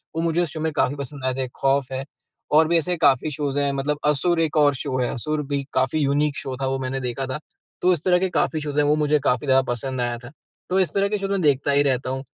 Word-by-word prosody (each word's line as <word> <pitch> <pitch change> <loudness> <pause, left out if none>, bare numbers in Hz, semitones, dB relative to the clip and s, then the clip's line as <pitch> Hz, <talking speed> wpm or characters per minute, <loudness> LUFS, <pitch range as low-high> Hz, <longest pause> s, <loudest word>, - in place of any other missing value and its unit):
वो 165 - 0
मुझे 165 +1 +1
उस 170 - -1
शो 160 - -5
में 160 0 -1
काफ़ी 140 -1 +1
पसंद 140 -1 -7
आए 130 - +1
थे। 130 -1 -2
खौफ 135 -1 +1
है 130 0 -3 0.6
और 160 - +4
भी 170 +1 +3
ऐसे 180 +2 0
काफ़ी 145 0 +3
शोज 145 -1 -2
हैं 140 -1 +1
मतलब 145 +2 -1
असुर 165 +4 +2
एक 160 -1 0
और 145 -1 +5
शो 130 0 -3
है, 125 - 0
असुर 150 +5 -2
भी 140 -1 -1
काफ़ी 130 +4 +1
यूनिक 145 0 +1
शो 130 -1 -4
था 135 - 0
वो 135 0 -1
मैंने 130 0 -3
देखा 125 +1 -3
था। 130 +3 -4 0.4
तो 180 - +4
इस 165 -3 -3
तरह 180 -1 +3
के 190 +1 0
काफ़ी 160 -2 0
शोज 145 -1 -4
हैं 145 - +3
वो 150 +1 +3
मुझे 150 0 +2
काफ़ी 130 +1 0
ज़्यादा 135 0 +5
पसंद 130 +2 -3
आया 120 0 -1
था। 120 - -10 0.4
तो 185 +1 +2
इस 185 - +1
तरह 200 0 +2
के 210 - 0
शोज 195 0 -3
में 195 -1 0
देखता 140 -2 +2
ही 140 0 +4
रहता 130 -2 0
हूँ। 135 +1 -3
145 Hz, 275 wpm, -23 LUFS, 135-155 Hz, 0.6 s, और